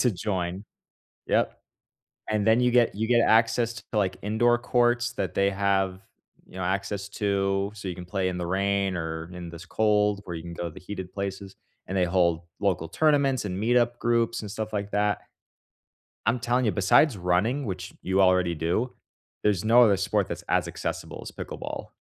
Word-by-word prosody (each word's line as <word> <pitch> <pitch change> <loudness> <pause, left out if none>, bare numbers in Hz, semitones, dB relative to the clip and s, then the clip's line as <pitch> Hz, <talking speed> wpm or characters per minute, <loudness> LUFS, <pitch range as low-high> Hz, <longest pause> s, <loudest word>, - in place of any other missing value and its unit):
to 125 - +4
join. 95 0 -3 0.6
Yep, - - +1 0.7
and 105 -1 0
then 110 +2 +5
you 125 0 +3
get 120 -3 +3
you 110 +2 -1
get 120 0 +4
access 115 +1 +3
to, 115 - -10
like, 95 -3 +1
indoor 120 +3 +2
courts 120 0 +1
that - - -3
they 100 0 +3
have, 95 -1 0 0.5
you - - -16
know, 95 - -3
access 100 +2 -2
to, 100 -1 0
so 100 -2 -8
you 90 - -3
can 90 - -8
play 95 +1 -1
in 90 - -4
the 90 -1 -3
rain 100 +1 0
or 80 0 -4
in 90 -1 -7
this 85 +2 -10
cold, 105 0 +2
where 85 - -5
you 80 - -5
can 85 0 -7
go 85 - -4
to - - -3
the - - -10
heated 95 -1 -7
places, 100 -1 -5 0.3
and 95 - -2
they 90 - +3
hold 85 -2 +2 0.2
local 90 -5 0
tournaments 140 - +2
and 90 -2 -3
meetup 120 +1 +2
groups 115 -1 +1
and 105 - -7
stuff 110 0 -4
like 100 -1 -3
that. 105 0 +1 1.0
I'm 120 +3 +2
telling 120 +1 +1
you, 110 - +2
besides 105 +6 +4
running, 95 +10 +1
which 95 -2 -5
you 95 +1 +2
already 90 -2 +3
do, 85 +11 -1 0.5
there's 105 -2 +1
no 120 +2 +7
other 100 -4 +4
sport 100 0 0
that's - - -6
as - - +1
accessible - - -5
as - - -8
pickleball. - - -6
100 Hz, 190 wpm, -26 LUFS, 95-115 Hz, 1.0 s, no